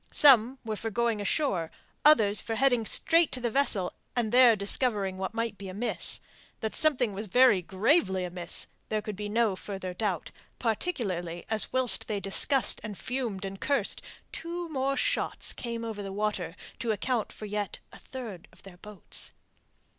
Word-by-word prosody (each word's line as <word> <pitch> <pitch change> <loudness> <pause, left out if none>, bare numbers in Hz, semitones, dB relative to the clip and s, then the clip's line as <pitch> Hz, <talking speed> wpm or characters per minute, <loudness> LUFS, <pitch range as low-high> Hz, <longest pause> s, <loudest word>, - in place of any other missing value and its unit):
Some 260 -3 +6
were 220 -1 -2
for 225 +2 -4
going 230 0 0
ashore, 195 - 0 0.3
others 215 -9 +5
for 225 - -4
heading 245 -3 +2
straight 330 +7 +4
to 255 - -1
the 240 -2 -2
vessel 215 -9 +2 0.2
and 235 -3 0
there 245 -2 +7
discovering 200 -1 +1
what 190 +3 -5
might 230 -2 -2
be 200 - -7
amiss. 210 +6 +1 0.4
That 220 - -2
something 255 -8 +2
was 210 +3 -4
very 245 -2 +5
gravely 190 - +1
amiss 175 -1 -3 0.2
there 215 -1 -1
could 215 - -5
be 205 +1 -5
no 220 -2 +1
further 185 -1 -6
doubt, 185 -4 -3 0.3
particularly 200 - -2
as 220 -1 +3
whilst 255 -2 +3
they 210 -2 -2
discussed 245 +7 +2
and 210 -3 -6
fumed 240 -7 -3
and 195 0 -7
cursed 280 -1 0 0.3
two 340 +1 -5
more 275 -2 -1
shots - - 0
came 235 -1 -5
over 220 -2 -5
the 195 -1 -6
water 195 -4 -2 0.2
to 230 - -1
account 225 +2 -1
for 215 - -9
yet 210 -1 -3 0.2
a - - -12
third 230 -9 -8
of - - -20
their 190 -2 -13
boats. 210 -1 -8
215 Hz, 170 wpm, -28 LUFS, 195-250 Hz, 0.4 s, there